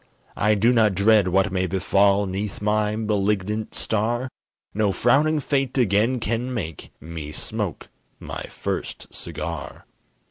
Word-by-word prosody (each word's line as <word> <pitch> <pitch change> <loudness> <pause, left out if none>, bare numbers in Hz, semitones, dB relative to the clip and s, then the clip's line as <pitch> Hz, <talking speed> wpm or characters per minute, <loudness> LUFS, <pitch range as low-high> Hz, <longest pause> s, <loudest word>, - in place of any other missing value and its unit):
I 105 0 +3
do 115 +5 +4
not 110 -5 +3
dread 100 0 +4
what 95 +1 +2
may 95 -1 0
befall 100 +2 +3
'Neath 95 +2 -4
my 105 0 +1
malignant 105 0 -1
star, 120 +4 -1 0.4
No 105 -1 +2
frowning 150 +9 +3
fate 135 -2 -1
again 115 +2 +2
can 115 +3 -2
make 85 - -5
Me 80 -1 -7
smoke - - -4 0.3
my - - -6
first - - -5
cigar. - - -6
105 Hz, 130 wpm, -23 LUFS, 95-115 Hz, 0.4 s, do